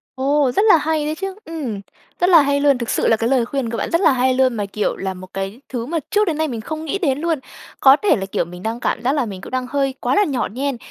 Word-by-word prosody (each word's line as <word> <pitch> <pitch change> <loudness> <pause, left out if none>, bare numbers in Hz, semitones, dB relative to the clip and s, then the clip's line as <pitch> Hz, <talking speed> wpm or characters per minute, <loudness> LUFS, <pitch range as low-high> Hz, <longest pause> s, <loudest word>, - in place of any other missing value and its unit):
Ồ, 275 0 +2
rất 400 - +2
là 420 - +7
hay 310 -1 -1
đấy 305 - -2
chứ! 385 +2 -5
Ừm, 275 -11 -5 0.4
rất 355 - +3
là 335 -4 +8
hay 280 0 +1
luôn, 280 -2 +3
thực 235 -2 -4
sự - - +1
là 225 - +5
cái 230 +1 0
lời 255 -3 +2
khuyên 260 -1 -3
của 230 - -3
bạn - - -2
rất 335 - +2
là 320 - +5
hay 260 0 +2
luôn, 260 -1 +2
mà 210 -3 -2
kiểu 205 +1 -2
là 190 -1 -4
một 185 0 -11
cái 195 +5 -5
thứ 240 -3 -4
mà 325 +5 -2
trước 420 0 +3
đến 315 -3 0
nay 315 - 0
mình 235 -6 -5
không 315 +6 -6
nghĩ 320 - -1
đến 280 -9 0
luôn! 325 -1 0 0.4
Có 270 0 +7
thể 415 - +4
là, 195 - -3
kiểu, 190 - -2
mình 180 +2 -11
đang 225 +2 -3
cảm 235 - -1
giác 260 +3 +2
là 285 -4 0
mình 195 -4 -7
cũng - - -10
đang 255 -1 -2
hơi 275 0 0
quá 250 +2 0
là 415 - +5
nhỏ 275 -9 -1
nhen. 270 +3 -2
265 Hz, 305 wpm, -20 LUFS, 230-310 Hz, 0.4 s, là